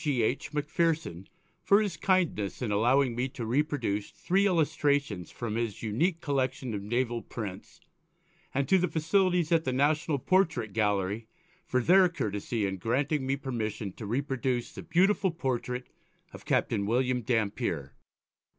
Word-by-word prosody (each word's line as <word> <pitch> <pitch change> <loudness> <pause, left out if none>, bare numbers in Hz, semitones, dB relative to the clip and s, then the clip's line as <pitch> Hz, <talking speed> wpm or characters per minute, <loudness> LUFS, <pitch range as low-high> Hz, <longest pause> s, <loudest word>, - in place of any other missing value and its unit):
G. 140 -7 +1
H. 125 +6 -1
Macpherson 150 - -1 0.3
for 200 - +5
his 205 -6 -1
kindness 160 - 0
in 110 - -1
allowing 120 +4 +3
me 125 +2 -1
to 125 -3 -6
reproduce 120 -5 0
three 195 +3 +1
illustrations 145 - +1
from 115 -3 -5
his 115 -3 -3
unique 160 - 0
collection 130 -3 -1
of 100 - -3
Naval 120 +2 -1
prints, 105 - -7 0.7
and 135 0 0
to 190 - +4
the 180 - +2
authorities 175 +1 +1
at 165 -1 +4
the 130 - -1
National 150 +3 +1
Portrait 155 - +1
Gallery 105 0 0 0.4
for 125 - +1
their 185 +3 +6
courtesy 105 - -2
in 95 -1 -2
granting 130 - 0
me 135 - +1
permission 110 -7 -4
to 105 - -8
reproduce 130 0 -1
the - - -8
beautiful 190 +2 +2
portrait 125 -5 -3 0.5
of - - -11
Captain 100 0 +1
William 125 +2 +1
Dampier. 105 - -1
130 Hz, 145 wpm, -29 LUFS, 110-155 Hz, 0.7 s, their